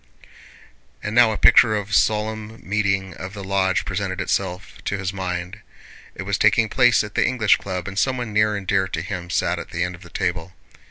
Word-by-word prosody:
And 105 - -3
now 120 -1 +6
a 105 - -2
picture 110 -2 +6
of 105 -1 -4
a - - -4
solemn 110 +1 0
meeting 100 -2 0
of 95 +2 -7
the 100 - -7
lodge 95 -1 0
presented 95 -1 -3
itself 95 +1 -3
to 100 - -1
his 95 -1 -3
mind. 90 +1 -4 0.6
It 95 - -6
was 100 0 -2
taking 110 +1 +3
place 120 -1 +4
at 105 0 -8
the - - +2
English 115 -5 +3
Club 95 -2 -5
and 100 0 -3
someone 125 -4 -1
near 105 0 +2
and 100 -2 -5
dear 95 -1 +1
to 80 - -4
him 90 -1 -6
sat - - 0
at - - -8
the - - -2
end 90 0 -3
of 85 - -13
the 85 - -13
table. 90 0 -3
100 Hz, 210 wpm, -22 LUFS, 95-110 Hz, 0.6 s, now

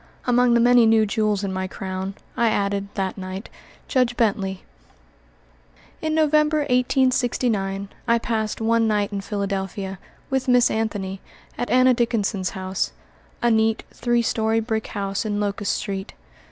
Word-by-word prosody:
Among 245 -1 +4
the - - +5
many 240 -1 +6
new 220 -1 +5
jewels 210 -1 0
in 195 -1 -2
my 190 0 -2
crown, 190 0 -5 0.2
I 235 - +2
added, 200 -1 0
that 195 0 -2
night, 185 +2 -6 0.4
Judge 250 -2 +1
Bently. 195 -4 0 1.4
In 315 -1 -1
November, 305 0 +3
1869, 245 -6 +1 0.2
I 235 0 +4
passed 220 -2 -2
one 225 0 +2
night 210 -1 +1
in 200 -1 -3
Philadelphia, 195 -1 -3 0.3
with 265 -1 0
Miss 245 -1 +4
Anthony, 205 -4 -2 0.3
at 245 - -3
Anna 255 0 +5
Dickinson's 215 -6 0
home 185 0 -6 0.7
a 240 - +4
neat, 220 0 +2
three 240 -1 +1
story 220 0 +1
brick 220 -1 -2
house 195 -1 -3
in 205 -2 -2
Locust 205 0 -1
Street. 195 -1 -4
220 Hz, 140 wpm, -23 LUFS, 195-240 Hz, 1.4 s, many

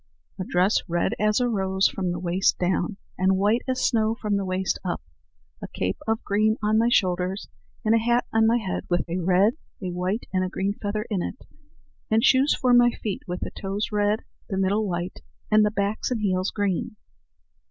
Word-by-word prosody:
"A - - -1
dress 185 +3 +2
red 175 0 0
as 215 +1 +2
a 250 - +2
rose 190 -3 +2
from 185 -2 -3
the 175 - -3
waist 180 +2 +1
down, 180 +2 0 0.2
and 190 +1 +3
white 210 +5 +2
as 255 -1 0
snow 220 -2 +2
from 210 -3 -1
the 200 - 0
waist 185 0 -1
up; 180 -2 -3 0.6
a - - -5
cape 90 0 -3
of 220 0 0
green 215 +2 +2
on 215 +1 +3
my 230 +1 +3
shoulders; 185 -2 +1 0.4
and 215 - +4
a 230 - +5
hat 240 +2 +2
on 220 0 +4
my 230 +2 +4
head 200 -6 -3
with 175 0 0
a 175 +2 -2
red, 185 +5 +3 0.3
a 185 -2 -4
white, 180 +5 -2
and 185 0 +2
a 185 - -2
green 195 +2 -1
feather 210 +1 -3
in 195 -4 0
it; 255 - -5 0.7
and 220 +1 +3
shoes 270 +2 +4
for 250 -1 +3
my 245 0 +7
feet 215 -4 -4
with 180 0 -4
the - - -4
toes 200 +2 -3
red, 210 +1 +1 0.3
the 195 - -2
middle 200 +3 +1
white, 175 +1 -4 0.3
and 215 0 +6
the 210 - +3
backs 205 0 -1
and 245 -4 -2
heels 185 -1 +1
green." 205 -1 -2
200 Hz, 205 wpm, -25 LUFS, 185-220 Hz, 0.7 s, my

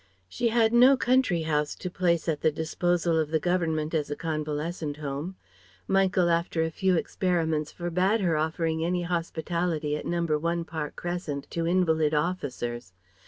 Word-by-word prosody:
She 235 - -1
had 225 0 +3
no 255 +3 +7
country 250 -11 +2
house 150 -2 0
to - - -6
place 175 -2 0
at 155 -3 -1
the 155 - +3
disposal 165 +2 0
of 155 -2 0
the 160 0 +1
Government 160 -3 0
as 150 -3 0
a 145 - -2
convalescent 155 -1 -3
home. 150 +5 -4 0.5
Michael 190 -2 +3
after 170 -1 +1
a 160 - -2
few 190 +2 +1
experiments 160 -3 0
forbade 180 +5 0
her 170 -4 +2
offering 160 +1 -1
any 175 +1 0
hospitality 170 -2 -1
at - - -5
No. 170 0 0
1 170 +2 0
Park 160 -3 -5
Crescent 175 -5 -4
to 165 -1 -1
invalid 160 -4 +2
officers. 130 - -3
165 Hz, 160 wpm, -27 LUFS, 155-180 Hz, 0.5 s, no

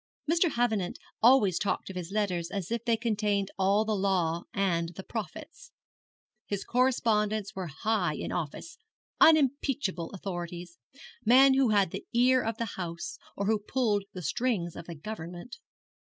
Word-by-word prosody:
Mr. 335 +2 +3
Havenant 220 -7 0 0.2
always 225 -7 +5
talked 200 - -2
of - - -11
his 180 0 -5
letters 185 -5 -1
as 195 0 -4
if 235 -1 -1
they 230 -2 +2
contained 210 -3 0
all 200 +3 +3
the 215 -1 0
law 180 -4 0
and 180 -6 0
the 190 - -7
prophets. 210 -7 -7 0.8
His 200 -1 -3
correspondents 215 -5 +1
were 190 -2 -4
high 175 +1 -1
in - - -5
office, 175 - -5 0.4
unimpeachable 275 - +3
authorities, 175 -3 -6 0.4
men 265 +4 +7
who 265 -2 +3
had 200 -4 +3
the 195 - -7
ear 250 +2 +4
of 225 -1 -3
the 230 - -1 0.2
House, 170 -1 -5 0.2
or 200 - -1
who 215 +1 +2
pulled 210 -2 0
the 180 - -7
strings 195 - -1
of 165 - -9
the 170 - -7
Government. 175 +4 -8
205 Hz, 155 wpm, -29 LUFS, 180-235 Hz, 0.8 s, men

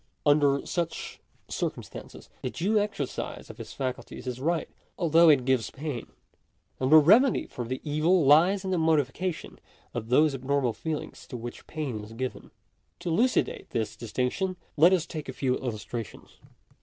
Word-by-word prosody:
Under 145 -2 +4
such 170 -2 -3 0.3
circumstances - - -5
the - - -2
due 210 +5 +1
exercise 200 -10 -4
of - - -17
his - - -8
faculties 130 -1 -5
is 125 0 -4
right, 165 +3 0 0.3
although 165 0 +5
it 135 -5 +5
gives 130 -4 +1
pain; 140 -4 -5 0.7
and 130 +2 0
the 155 - +10
remedy 215 - +5
for 120 - -6
the 130 +2 -3
evil 155 +3 +2
lies 175 +8 +5
in 190 - -2
the 180 - +1
modification 160 +2 0 0.3
of 115 -1 -5
those 150 +4 +4
abnormal 135 -2 0
feelings 155 +3 -5
to 125 - -6
which 120 +1 -8
pain 135 -9 -4
is 110 +2 -11
given. 130 +2 -5 0.5
To - - -3
elucidate 235 +10 +1
this 110 -2 -2
distinction 125 - -2 0.2
let 165 +4 +6
us 180 -4 +2
take 155 -4 -7
a - - -4
few 130 -1 0
illustrations. 115 -3 -6
145 Hz, 155 wpm, -27 LUFS, 125-170 Hz, 0.7 s, the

